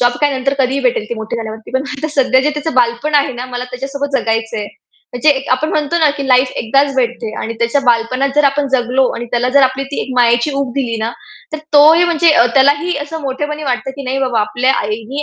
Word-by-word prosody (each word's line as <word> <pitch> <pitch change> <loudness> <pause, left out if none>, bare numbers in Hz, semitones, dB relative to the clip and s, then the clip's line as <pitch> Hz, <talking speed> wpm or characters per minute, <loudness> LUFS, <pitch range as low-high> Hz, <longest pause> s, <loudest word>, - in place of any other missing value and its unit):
Job 245 0 +3
काय, 290 -1 +2
नंतर 275 +2 0
कधीही 265 +1 +1
भेटेल, 245 -4 0
ती - - -1
मोठी 220 +1 -5
झाल्यावरती 220 -1 -7
पण 260 - +1 0.2
आता 310 +2 -3
सध्या 260 +1 +3
जे 295 - +1
त्याचं 300 +1 -4
बालपण 245 +5 +1
आहे 285 -1 +3
ना, 245 +1 -6
मला 250 0 -5
त्याच्यासोबत 275 +2 -3
जगायचंय." 225 -1 -2 0.5
म्हणजे 245 +5 0
एक 270 -1 -1
आपण 260 +5 +1
म्हणतो 305 +2 0
ना, 310 -2 +4
की 280 -2 -4
लाईफ 255 +1 +4
एकदाच 275 +4 +1
भेटते. 240 -3 -1
आणि 230 +1 -4
त्याच्या 235 +4 +1
बालपणात 245 +3 +1
जर 295 - +4
आपण 280 +1 +1
जगलो 255 +1 +2
आणि 235 - -5
त्याला 245 +1 +1
जर 280 +1 +4
आपली 260 +1 +1
ती - - -2
एक - - -8
मायेची 240 +4 +3
ऊब 275 -3 -2
दिली 240 -5 -2
ना, 225 - -1 0.4
तर 310 - -3
तोही 315 +4 +6
म्हणजे 340 -1 +3
अ, 240 - +5
त्यालाही 285 +5 +3
असं 320 +2 -7
मोठेपणी 295 +3 -4
वाटतं, 260 0 -2
की 280 - -6
"नाही 265 +1 -2
बाबा, 250 -4 0
आपल्या 250 +5 +1
आईने 225 +7 -4
265 Hz, 225 wpm, -15 LUFS, 240-285 Hz, 0.5 s, तोही